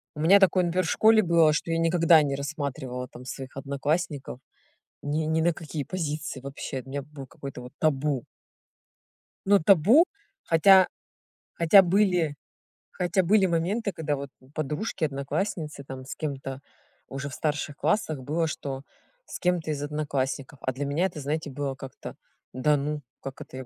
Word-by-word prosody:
У -, -, -8 dB
меня 180 Hz, +6 st, +6 dB
такое, 185 Hz, -1 st, +4 dB
например, 175 Hz, +1 st, 0 dB
в -, -, -2 dB
школе 220 Hz, 0 st, +5 dB
было, 165 Hz, -3 st, +4 dB
что 155 Hz, +3 st, -2 dB
я 165 Hz, -, +1 dB
никогда 165 Hz, -1 st, +5 dB
не 140 Hz, -2 st, -1 dB
рассматривала 140 Hz, -3 st, -4 dB
там 120 Hz, 0 st, -12 dB
своих 130 Hz, +1 st, -7 dB
одноклассников 140 Hz, +1 st, -2 dB, 0.6 s
ни 150 Hz, +2 st, -1 dB
ни 160 Hz, +1 st, +1 dB
на 170 Hz, +2 st, +3 dB
какие 155 Hz, -2 st, -5 dB
позиции 155 Hz, -4 st, -4 dB
вообще, 135 Hz, 0 st, -6 dB
у -, -, -15 dB
меня 140 Hz, +1 st, -4 dB
было 140 Hz, -1 st, -10 dB
какое-то 135 Hz, -1 st, -9 dB
вот 125 Hz, +1 st, -11 dB
табу. 145 Hz, -4 st, +1 dB, 1.2 s
Но 200 Hz, +1 st, +5 dB
табу, 200 Hz, -, +6 dB, 0.4 s
хотя 185 Hz, +3 st, +6 dB, 0.7 s
хотя 170 Hz, +4 st, +7 dB
были, 180 Hz, -5 st, +2 dB, 0.6 s
хотя 180 Hz, +1 st, 0 dB
были 195 Hz, +3 st, +4 dB
моменты, 190 Hz, +5 st, 0 dB
когда 160 Hz, -4 st, -2 dB
вот 140 Hz, 0 st, -6 dB, 0.2 s
подружки, 155 Hz, +6 st, -3 dB
одноклассницы 150 Hz, +2 st, -2 dB
там 130 Hz, -1 st, -8 dB
с 135 Hz, -, -7 dB
кем-то 135 Hz, -3 st, -5 dB, 0.5 s
уже 140 Hz, +1 st, -5 dB
в -, -, -10 dB
старших 145 Hz, 0 st, -2 dB
классах 155 Hz, -2 st, 0 dB
было, 160 Hz, +5 st, -1 dB
что 135 Hz, -3 st, -5 dB, 0.4 s
с -, -, -8 dB
кем-то 175 Hz, -3 st, 0 dB
из 145 Hz, -2 st, -3 dB
одноклассников. 145 Hz, -2 st, -3 dB
А 130 Hz, -, -1 dB
для 140 Hz, +3 st, -3 dB
меня 145 Hz, +6 st, +1 dB
это, 175 Hz, -5 st, -4 dB
знаете, 150 Hz, +2 st, -3 dB
было 140 Hz, 0 st, -3 dB
как-то: 135 Hz, -1 st, -9 dB, 0.4 s
"Да 145 Hz, +4 st, +2 dB
ну, 150 Hz, +1 st, -3 dB, 0.2 s
как 135 Hz, -1 st, -8 dB
это 130 Hz, -, -9 dB
я 130 Hz, -, -7 dB
150 Hz, 160 wpm, -26 LUFS, 140-170 Hz, 1.2 s, хотя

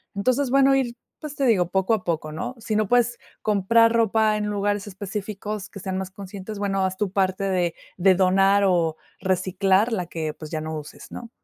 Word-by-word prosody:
entonces 255 Hz, +6 st, +1 dB
bueno 275 Hz, 0 st, +5 dB
ir, 250 Hz, -3 st, 0 dB, 0.2 s
pues 300 Hz, -2 st, -7 dB
te 275 Hz, -, -2 dB
digo 180 Hz, -7 st, +3 dB
poco 190 Hz, +3 st, +1 dB
a 205 Hz, -, -6 dB
poco, 160 Hz, -2 st, -2 dB
¿no? 160 Hz, +10 st, -4 dB
Si 220 Hz, -1 st, -3 dB
no 215 Hz, -1 st, +1 dB
puedes 240 Hz, -1 st, +3 dB, 0.2 s
comprar 230 Hz, +3 st, +3 dB
ropa 220 Hz, -1 st, +2 dB
en 210 Hz, -, -2 dB
lugares 205 Hz, 0 st, -1 dB
específicos 205 Hz, +1 st, -5 dB
que 200 Hz, -, -10 dB
sean 190 Hz, 0 st, -3 dB
más 190 Hz, 0 st, -4 dB
conscientes, 200 Hz, +2 st, -8 dB
bueno, 195 Hz, -1 st, 0 dB
haz 185 Hz, 0 st, -3 dB
tu 200 Hz, -1 st, -1 dB
parte 190 Hz, 0 st, 0 dB
de 180 Hz, -3 st, 0 dB, 0.2 s
de 190 Hz, +1 st, +5 dB
donar 195 Hz, +2 st, +4 dB
o 170 Hz, -4 st, +1 dB, 0.2 s
reciclar 190 Hz, +3 st, +2 dB
la 180 Hz, -4 st, -1 dB
que, 160 Hz, -2 st, -4 dB
pues, 155 Hz, -1 st, -10 dB
ya 155 Hz, -, -2 dB
no 160 Hz, 0 st, -4 dB
uses, 150 Hz, 0 st, -10 dB
¿no? 235 Hz, -, -8 dB
195 Hz, 200 wpm, -24 LUFS, 185-215 Hz, 0.2 s, bueno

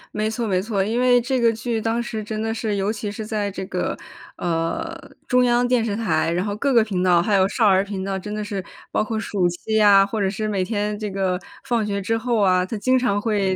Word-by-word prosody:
没 215 Hz, 0 st, 0 dB
错 225 Hz, +1 st, -2 dB
没 185 Hz, -3 st, +1 dB
错， 200 Hz, -1 st, -1 dB
因 225 Hz, +5 st, -1 dB
为 250 Hz, -1 st, +4 dB
这 260 Hz, +2 st, -1 dB
个 230 Hz, -1 st, +3 dB
剧 225 Hz, +1 st, -2 dB
当 225 Hz, +2 st, 0 dB
时 220 Hz, -2 st, -4 dB
真 215 Hz, +1 st, -4 dB
的 225 Hz, 0 st, -1 dB
是 220 Hz, -2 st, -2 dB
尤 195 Hz, +2 st, 0 dB
其 210 Hz, -1 st, -4 dB
是 215 Hz, +2 st, -6 dB
在 210 Hz, -2 st, -2 dB
这 190 Hz, -, -5 dB
个， 180 Hz, -1 st, -2 dB, 0.4 s
呃， 170 Hz, -, -2 dB, 0.4 s
中 250 Hz, -1 st, +4 dB
央 240 Hz, 0 st, +3 dB
电 245 Hz, -2 st, +2 dB
视 205 Hz, -3 st, -1 dB
台， 215 Hz, -6 st, 0 dB
然 175 Hz, +2 st, 0 dB
后 205 Hz, -1 st, -3 dB
各 275 Hz, +6 st, 0 dB
个 230 Hz, -2 st, +6 dB
频 190 Hz, -4 st, -2 dB
道 175 Hz, -2 st, +4 dB
还 205 Hz, +4 st, +1 dB
有 190 Hz, 0 st, +4 dB
少 220 Hz, +2 st, +2 dB
儿 190 Hz, -1 st, +4 dB
频 200 Hz, -2 st, -5 dB
道， 195 Hz, 0 st, -2 dB
真 210 Hz, +2 st, -6 dB
的 210 Hz, 0 st, -3 dB
是。 200 Hz, -2 st, -4 dB, 0.3 s
包 -, -, +1 dB
括 220 Hz, +1 st, -3 dB
暑 195 Hz, -5 st, 0 dB
期 175 Hz, +5 st, -4 dB
呀， 205 Hz, -2 st, +7 dB
或 215 Hz, +2 st, -4 dB
者 195 Hz, -, +1 dB
是 215 Hz, +2 st, -3 dB
每 200 Hz, -3 st, 0 dB
天 210 Hz, +1 st, -2 dB
这 210 Hz, 0 st, -4 dB
个 190 Hz, -2 st, -1 dB, 0.3 s
放 235 Hz, -4 st, 0 dB
学 200 Hz, -1 st, -2 dB
之 225 Hz, +4 st, 0 dB
后 235 Hz, 0 st, 0 dB
啊， 185 Hz, -2 st, +3 dB
它 205 Hz, -, -5 dB
经 255 Hz, +5 st, +3 dB
常 245 Hz, -5 st, +1 dB
会 205 Hz, -4 st, +1 dB
210 Hz, 275 characters per minute, -22 LUFS, 195-225 Hz, 0.4 s, 呀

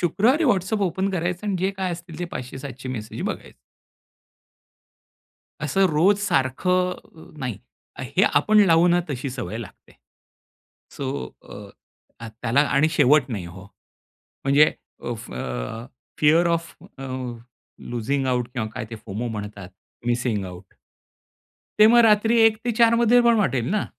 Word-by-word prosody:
शुक्रवारी 240 Hz, -, +2 dB
WhatsApp 205 Hz, -, +1 dB
open 190 Hz, +3 st, -1 dB
करायचं 180 Hz, +2 st, -3 dB
आणि 200 Hz, -2 st, 0 dB
जे 190 Hz, +2 st, 0 dB
काय 190 Hz, -2 st, -2 dB
असतील 170 Hz, -2 st, -9 dB
ते 175 Hz, -, -2 dB
500 130 Hz, +1 st, -6 dB
700 130 Hz, -2 st, -8 dB
मेसेज 115 Hz, +5 st, -6 dB
बघायचं. 205 Hz, -, -5 dB, 2.1 s
असं 190 Hz, +7 st, +2 dB
रोज 185 Hz, +7 st, +3 dB
सारखं 180 Hz, 0 st, -1 dB
नाही, 125 Hz, -6 st, -4 dB, 0.4 s
हे -, -, -1 dB
आपण 215 Hz, 0 st, +4 dB
लावू 165 Hz, 0 st, +5 dB
ना, 175 Hz, 0 st, +3 dB
तशी 135 Hz, 0 st, -4 dB
सवय 125 Hz, -3 st, -5 dB
लागते. 115 Hz, -, -11 dB, 1.0 s
सो 140 Hz, -, -5 dB, 0.4 s
अ, -, -, -10 dB, 0.7 s
अ, 115 Hz, -, -7 dB
त्याला 125 Hz, +4 st, +2 dB
आणि 150 Hz, +3 st, +3 dB
शेवट 150 Hz, -1 st, +4 dB
नाही 100 Hz, -6 st, -4 dB
हो, 95 Hz, +2 st, -11 dB, 0.8 s
म्हणजे 140 Hz, +3 st, +5 dB, 0.3 s
अ, 120 Hz, -, -2 dB
फ 115 Hz, -, -11 dB, 0.9 s
fear 160 Hz, +3 st, +4 dB
of 165 Hz, 0 st, -2 dB, 0.2 s
a, 135 Hz, -, -7 dB, 0.8 s
losing 125 Hz, +4 st, -2 dB
out 125 Hz, -2 st, 0 dB
किंवा 115 Hz, -4 st, -2 dB
काय -, -, -4 dB
ते 115 Hz, -, -6 dB
"फोमो" 110 Hz, +2 st, -5 dB
म्हणतात, 105 Hz, -3 st, -7 dB, 0.4 s
मिसिंग 120 Hz, -4 st, 0 dB
आऊट. 90 Hz, +1 st, -12 dB, 1.0 s
ते 215 Hz, -, +8 dB
मग 240 Hz, +2 st, +6 dB
रात्री 225 Hz, +2 st, +4 dB
1 225 Hz, -1 st, +5 dB
ते 240 Hz, -, 0 dB
4मध्ये 230 Hz, +1 st, +4 dB
पण 235 Hz, -1 st, +4 dB
वाटेल 135 Hz, -, 0 dB
ना? 215 Hz, 0 st, 0 dB
155 Hz, 140 wpm, -23 LUFS, 125-195 Hz, 2.1 s, ते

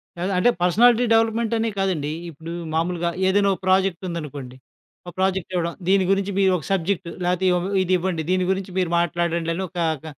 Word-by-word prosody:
కాదు. 180 Hz, +3 st, -2 dB
అంటే 185 Hz, -, +4 dB
పర్సనాలిటీ 235 Hz, +7 st, +4 dB
డెవలప్‌మెంటనే 225 Hz, 0 st, +1 dB
కాదండి. 170 Hz, -7 st, -1 dB, 0.2 s
ఇప్పుడు 165 Hz, +1 st, -9 dB, 0.2 s
మామూలుగా 170 Hz, +1 st, 0 dB, 0.2 s
ఏదైనా 200 Hz, +1 st, +3 dB
ఒక -, -, -7 dB
ప్రాజెక్టుందనుకోండి. 170 Hz, -8 st, -1 dB, 0.5 s
ఆ -, -, -4 dB
ప్రాజెక్ట్ 190 Hz, -1 st, 0 dB
ఇవ్వడం. 170 Hz, -1 st, -1 dB
దీని 195 Hz, 0 st, +3 dB
గురించి 195 Hz, 0 st, 0 dB
మీరోక 185 Hz, -4 st, +2 dB
సబ్జెక్ట్ 190 Hz, -1 st, -1 dB, 0.2 s
లేకపోతే 180 Hz, +1 st, 0 dB
ఇయొ 180 Hz, 0 st, +2 dB, 0.2 s
ఇదివ్వండి. 180 Hz, -2 st, 0 dB
దీని 185 Hz, 0 st, +2 dB
గురించి 190 Hz, 0 st, -3 dB
మీరు 180 Hz, -2 st, +1 dB
మాట్లాడండని 170 Hz, 0 st, -1 dB
ఒక 175 Hz, -, -12 dB, 0.3 s
క -, -, -12 dB
185 Hz, 155 wpm, -22 LUFS, 170-195 Hz, 0.5 s, అంటే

